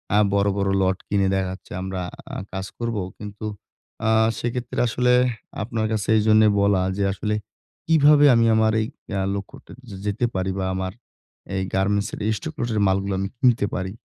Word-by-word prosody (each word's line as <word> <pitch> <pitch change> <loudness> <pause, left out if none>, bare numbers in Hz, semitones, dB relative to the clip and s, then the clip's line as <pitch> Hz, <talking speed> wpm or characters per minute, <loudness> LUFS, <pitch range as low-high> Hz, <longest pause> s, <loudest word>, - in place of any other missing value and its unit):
আ - - +5 0.2
বড়, 100 0 +2
বড় 100 0 +1
lot 95 0 +2
কিনে 100 -1 +1
দেখা 95 -1 0
যাচ্ছে 95 - -11
আমরা 95 0 -4 0.3
আ - - -4 0.2
কাজ 95 0 -4
করবো। 115 -4 -2 0.2
কিন্তু 105 +1 -8 0.6
আ - - +4 0.3
সেক্ষেত্রে 120 0 -3
আসলেহ 125 +1 +3 0.4
আপনার 110 0 -2
কাছে 105 -4 -1
এইজন্যই 110 0 +5
বলা 100 -2 +3 0.2
যে 100 - 0
আসলে 105 +2 -2 0.5
কিভাবে 150 -2 +6
আমি 115 0 +4
আমার 110 0 +3
এই 110 - -1 0.3
আ - - 0 0.2
লক্ষ্যটা 100 -1 -9 0.2
যে 100 - -8
যেতে 105 +4 0
পারি 95 0 -1
বা 95 - -1
আমার 95 0 -2 0.6
এই 95 - 0
গার্মেন্টস 100 +2 +1
এর - - -5 0.2
stock 160 -2 -7
lot 120 - -1
এর 105 - +1
মালগুলা 95 0 0
আমি 100 0 -2
কিনতে 120 -5 +3
পারি? 95 -1 -3
105 Hz, 180 wpm, -23 LUFS, 95-115 Hz, 0.6 s, কিভাবে